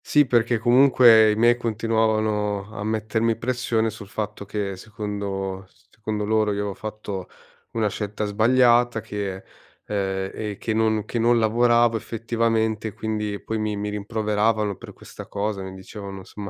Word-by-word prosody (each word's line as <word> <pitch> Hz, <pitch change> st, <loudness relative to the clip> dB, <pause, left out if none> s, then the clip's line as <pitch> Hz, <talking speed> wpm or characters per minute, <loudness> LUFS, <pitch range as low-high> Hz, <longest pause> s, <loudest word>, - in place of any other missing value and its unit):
Sì, 150 Hz, -1 st, +4 dB
perché, 120 Hz, -1 st, +2 dB
comunque, 120 Hz, -2 st, +6 dB
i -, -, 0 dB
miei 120 Hz, +2 st, +4 dB
continuavano 110 Hz, -3 st, 0 dB
a 100 Hz, -, -4 dB
mettermi 110 Hz, +1 st, 0 dB
pressione 115 Hz, -2 st, 0 dB
sul 105 Hz, -2 st, -10 dB
fatto 105 Hz, -1 st, -5 dB
che, 100 Hz, -1 st, -3 dB
secondo 100 Hz, -2 st, -5 dB, 0.2 s
secondo 105 Hz, -1 st, -4 dB
loro, 110 Hz, 0 st, +2 dB
io 100 Hz, -, -3 dB
avevo 100 Hz, -1 st, -3 dB
fatto 105 Hz, -3 st, -6 dB, 0.4 s
una 110 Hz, -2 st, +1 dB
scelta 105 Hz, +1 st, -3 dB
sbagliata 120 Hz, +2 st, +3 dB
che, 100 Hz, -3 st, -5 dB, 0.4 s
uhm, 105 Hz, -, -4 dB, 0.4 s
e 105 Hz, -2 st, -5 dB
che 110 Hz, -, -2 dB
non 110 Hz, -1 st, +1 dB
che 120 Hz, -, -3 dB
non 120 Hz, +1 st, +4 dB
lavoravo 120 Hz, +1 st, +3 dB
effettivamente. 110 Hz, -1 st, -1 dB
Quindi, 105 Hz, -2 st, -3 dB
poi, 110 Hz, 0 st, -3 dB
mi 105 Hz, -1 st, -1 dB
mi 105 Hz, +1 st, -3 dB
rimproveravano 105 Hz, 0 st, 0 dB
per -, -, -11 dB
questa -, -, -11 dB
cosa, 100 Hz, 0 st, -3 dB
mi 95 Hz, 0 st, -7 dB
dicevano, 95 Hz, +1 st, -8 dB
insomma, 100 Hz, +2 st, -8 dB
110 Hz, 150 wpm, -23 LUFS, 105-115 Hz, 0.4 s, comunque